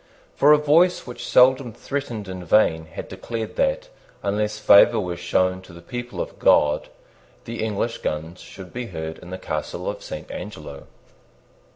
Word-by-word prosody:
For 145 - +5
a 150 - +8
voice 160 +5 +3
which 125 - -7
seldom 130 -1 +5
threatened 120 -8 -5
in 95 -1 -6
vain 80 -3 +3
had 80 - -8
declared 115 -2 -6
that, - - 0 0.3
unless 105 +1 -1
favour 105 +2 +6
were 90 -4 -3
shown 95 +1 0
to 90 -2 -15
the 85 - -12
people 120 +3 -6
of - - -5
God, 75 0 +3 0.6
the 115 -1 -4
English 110 +2 -2
guns 80 +4 -4
should 95 -2 -11
be 125 -1 -4
heard 80 -5 -6
in 90 - -12
the 95 - -5
Castle 75 -4 -4
of - - -4
Saint - - -8
Angelo. 75 -9 -8
105 Hz, 165 wpm, -23 LUFS, 90-125 Hz, 0.6 s, a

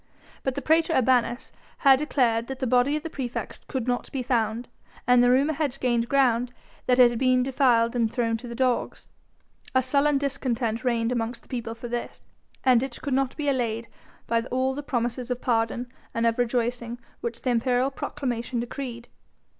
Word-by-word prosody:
But 265 -1 -2
the 280 - -4
praetor 325 +2 +3
urbanus 250 -2 +2 0.3
had 270 -2 +5
declared 240 -6 +1
that 265 - -5
the 260 - -2
body 250 +4 +3
of 305 - -3
the 325 - -4
praefect 250 -3 -5
could 255 -4 -3
not 245 -1 -1
be 265 -2 -3
found, 235 -1 0 0.4
and 245 0 +5
the 245 - +5
rumour 275 +5 +3
had 280 -3 -2
gained 235 -2 +1
ground 250 -3 +2 0.4
that 250 - +4
it 245 -2 +7
had 235 - -3
been 255 -1 +3
defiled 250 -3 +2
and 230 -2 +1
thrown 230 -2 0
to 245 +2 -9
the 235 - -6
dogs. 255 -1 -1 0.6
A 260 - +4
sullen 280 +3 +2
discontent 250 -5 -1
reigned 235 -2 +1
amongst 235 0 -2
the - - -24
people 230 -3 -4
for 230 +1 -7
this, 240 0 -5 0.4
and 250 -3 +5
it 265 -2 -5
could 280 - -1
not 265 0 0
be 295 -2 -2
allayed 230 -4 -1 0.4
by 230 0 +1
all 260 +1 0
the 290 - -4
promises 245 -2 -2
of 250 -1 -2
pardon 235 0 0 0.3
and 230 0 +1
of 230 +1 +1
rejoicings 240 0 -1 0.2
which 235 0 -5
the 255 - +1
imperial 250 +2 +1
proclamation 250 -3 -3
decreed. 240 0 -5
245 Hz, 185 wpm, -26 LUFS, 235-265 Hz, 0.6 s, it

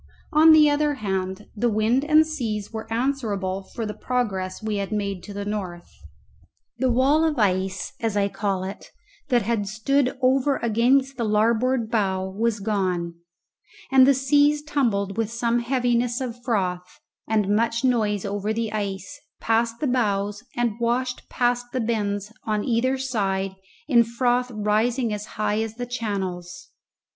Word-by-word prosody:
On 315 +2 +7
the 310 -1 +7
other 295 0 +1
hand, 190 -3 -3
the 240 +3 +1
wind 225 +5 +2
and 310 +1 +5
seas 230 -10 -4
were 220 0 -6
answerable 225 -7 -1
for 225 +4 -6
the 210 - -4
progress 200 -6 -2
we 215 -1 -1
had 195 -1 -3
made 200 -3 -2
to 205 - -10
the 200 0 -5
north. 185 -5 -5 0.9
The 260 - +2
wall 270 +6 +3
of 315 -3 +1
ice 190 -3 0
(as 225 -3 -1
I 200 -1 +2
call 200 -2 -2
it) 190 +1 -7 0.4
that 245 -4 +3
had 210 -1 -1
stood 255 +6 0
over 265 +2 +3
against 250 +4 +2
the 235 - -1
larboard 225 +2 +1
bow 190 -4 0
was 215 +3 -1
gone, 185 -5 -1 0.8
and 265 -1 +7
the 280 - +5
seas 290 +3 +3
tumbled 225 -10 0
with 225 -2 0
some 235 +1 0
heaviness 240 -1 0
of 245 -2 -5
froth 180 -6 -2 0.3
and 210 -2 +1
much 230 +2 0
noise 215 -6 +1
over 205 +1 -2
the 225 -1 -2
ice, 210 +7 -4 0.2
past 230 +1 0
the - - +1
bows, 205 -4 0
and 240 -2 -1
washed 250 +2 -1
past 245 0 0
the 255 - 0
bends 210 -2 -2
on 215 -1 0
either 255 +2 +1
side 195 -7 -1 0.4
in 240 -5 +5
froth 245 +2 0
rising 220 +2 0
as 210 0 -5
high 210 0 0
as 225 0 -4
the 245 +1 -4
channels. 200 -1 -4
225 Hz, 155 wpm, -24 LUFS, 205-250 Hz, 0.9 s, On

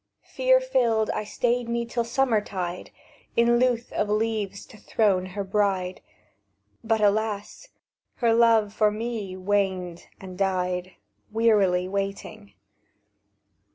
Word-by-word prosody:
"Fear - - +3
filled, 235 - +1
I - - -3
stayed 240 +2 -1
me 235 0 -1
till 235 0 -2
summer 235 -2 +1
tide, 180 -3 -5 0.5
In 235 +1 +4
lewth 245 -1 0
of 210 - -1
leaves 210 -2 -1
to 215 - -15
throne 195 -4 +1
her 200 +2 -4
bride; 190 -2 -1 0.8
But 225 -1 +1
alas! 210 - 0 0.5
her 235 -2 +2
love 225 -3 +4
for 215 -1 +3
me 210 -3 -4
waned 185 -3 -1
and 185 -1 -10
died, 185 -1 -1 0.4
Wearily 205 -5 +3
waiting. 200 +2 -5
210 Hz, 120 wpm, -25 LUFS, 190-230 Hz, 0.8 s, In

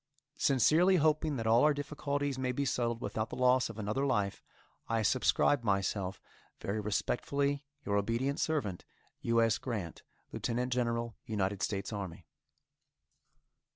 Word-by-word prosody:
Sincerely 155 +8 +4
hoping 155 -2 +2
that 115 -3 -3
all 115 +3 +5
our 150 -1 +4
difficulties 145 -1 -2
may 130 -1 0
be 140 +3 -1
settled 120 -2 -1
without 110 +1 -2
the - - -6
loss 125 0 +3
of 115 - -8
another 110 +5 -1
life, 105 -8 0 0.5
I 115 -1 +1
subscribe 130 +5 +3
myself, 100 -2 0 0.4
Very 100 +2 -2
respectfully, 140 +7 -1 0.2
Your 100 0 +1
obedient 115 +7 0
servant, 115 - -1 0.4
U. 115 0 +3
S. 115 -2 +2
GRANT, 105 -10 -4 0.3
Lieutenant 125 +1 -1
General, 115 -2 -1
United 100 -2 -1
States 100 +1 -2
Army. 95 -5 -6
120 Hz, 135 wpm, -32 LUFS, 105-140 Hz, 0.5 s, all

